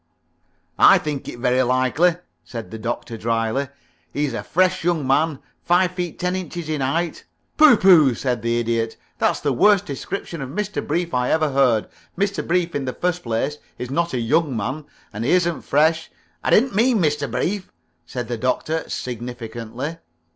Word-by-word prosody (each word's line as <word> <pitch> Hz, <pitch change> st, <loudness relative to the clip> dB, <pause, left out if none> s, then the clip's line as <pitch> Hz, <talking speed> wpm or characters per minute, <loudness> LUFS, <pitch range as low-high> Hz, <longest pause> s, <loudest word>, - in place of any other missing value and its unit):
"I -, -, +8 dB
think 150 Hz, -2 st, -4 dB
it -, -, -8 dB
very 125 Hz, +1 st, +2 dB
likely," 130 Hz, +7 st, +2 dB, 0.3 s
said 115 Hz, -2 st, -8 dB
the 110 Hz, -, -7 dB
Doctor, 115 Hz, 0 st, -4 dB
dryly. 115 Hz, +4 st, -1 dB, 0.4 s
"He's 145 Hz, -3 st, -1 dB
a -, -, -3 dB
fresh 185 Hz, 0 st, +1 dB
young 165 Hz, -4 st, +1 dB
man, 145 Hz, +3 st, +2 dB, 0.3 s
five 180 Hz, +1 st, +3 dB
feet 180 Hz, -2 st, -4 dB
ten 180 Hz, +1 st, -1 dB
inches 175 Hz, -3 st, -5 dB
in 155 Hz, -3 st, -1 dB
height 165 Hz, +6 st, -1 dB, 0.2 s
" -, -, -46 dB
"Pooh 300 Hz, -6 st, +8 dB
pooh!" 160 Hz, -11 st, +6 dB
said 125 Hz, -1 st, -2 dB
the 115 Hz, +1 st, 0 dB
Idiot. 115 Hz, -1 st, -1 dB, 0.2 s
"That's -, -, +1 dB
the 145 Hz, -, 0 dB
worst 200 Hz, -, +4 dB
description 165 Hz, +3 st, -5 dB
of 135 Hz, -, -5 dB
Mr. 210 Hz, +7 st, -3 dB
Brief 170 Hz, +2 st, -1 dB
I 125 Hz, 0 st, +1 dB
ever 155 Hz, -2 st, +2 dB
heard. 130 Hz, -5 st, +3 dB, 0.3 s
Mr. 200 Hz, +1 st, 0 dB
Brief, 175 Hz, 0 st, +1 dB
in 140 Hz, -2 st, -2 dB
the 130 Hz, -, -3 dB
first 180 Hz, 0 st, -1 dB
place, 125 Hz, +6 st, -2 dB, 0.2 s
is 125 Hz, +1 st, -6 dB
not 170 Hz, 0 st, 0 dB
a -, -, 0 dB
young 140 Hz, +2 st, +1 dB
man, 130 Hz, +8 st, -3 dB, 0.3 s
and 105 Hz, +2 st, -4 dB
he 125 Hz, -, 0 dB
isn't 175 Hz, -2 st, +1 dB
fresh 160 Hz, +3 st, +2 dB, 0.2 s
" -, -, -40 dB
"I -, -, 0 dB
didn't 250 Hz, +4 st, +4 dB
mean 235 Hz, +4 st, +3 dB
Mr. 150 Hz, -6 st, 0 dB
Brief," 180 Hz, -, -2 dB, 0.3 s
said 120 Hz, +8 st, -5 dB
the 120 Hz, 0 st, -3 dB
Doctor, 155 Hz, +6 st, -1 dB
significantly. 120 Hz, +4 st, -5 dB
145 Hz, 180 wpm, -22 LUFS, 125-175 Hz, 0.4 s, I